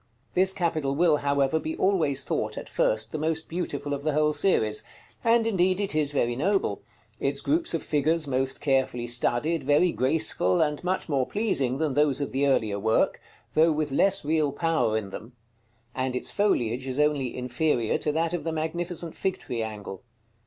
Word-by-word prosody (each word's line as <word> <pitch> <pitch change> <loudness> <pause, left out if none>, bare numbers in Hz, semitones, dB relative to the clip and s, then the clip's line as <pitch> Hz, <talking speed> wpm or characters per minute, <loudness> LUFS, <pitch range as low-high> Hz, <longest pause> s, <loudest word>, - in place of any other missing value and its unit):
This 190 +1 +4
capital 160 -7 -1
will, 160 -1 +4
however, 140 +1 +1
be 160 0 -4
always 160 -8 +1
thought, - - -2
at - - -6
first, 110 +1 0
the 155 - -3
most 160 +1 -1
beautiful 145 -4 -3
of 140 - -3
the 155 +1 -1
whole 150 0 +2
series: 130 - +2 0.4
and 230 -1 +4
indeed 185 -3 +2
it 200 -4 -1
is 150 -2 +2
very 120 -4 0
noble; 175 - 0 0.4
its 140 0 -1
groups 335 +3 0
of - - -3
figures 155 +2 +1
most 135 -1 -2
carefully 130 -4 +1
studied, 125 +6 0
very 145 +6 +3
graceful, 130 - +1
and 150 0 0
much 185 +1 -1
more 135 -5 0
pleasing 140 - 0
than 155 -2 0
those 145 -1 +2
of 140 - -3
the 140 +2 +1
earlier 110 -7 +1
work, 110 +2 +1 0.3
though 160 +1 +4
with 150 -1 -1
less 195 +5 +2
real 155 -1 +1
power 160 -9 +1
in 100 -3 -5
them; 115 +5 -9 0.6
and 130 -1 -2
its 125 - -1
foliage 130 - 0
is 130 +2 -3
only 145 -4 +1
inferior 125 -1 0
to 150 - 0
that 165 +2 0
of 175 -4 -2
the 165 - -2
magnificent 165 +1 -3
Fig 190 -1 -1
tree 120 -2 -4
angle. 105 -3 -6
150 Hz, 180 wpm, -26 LUFS, 130-165 Hz, 0.6 s, This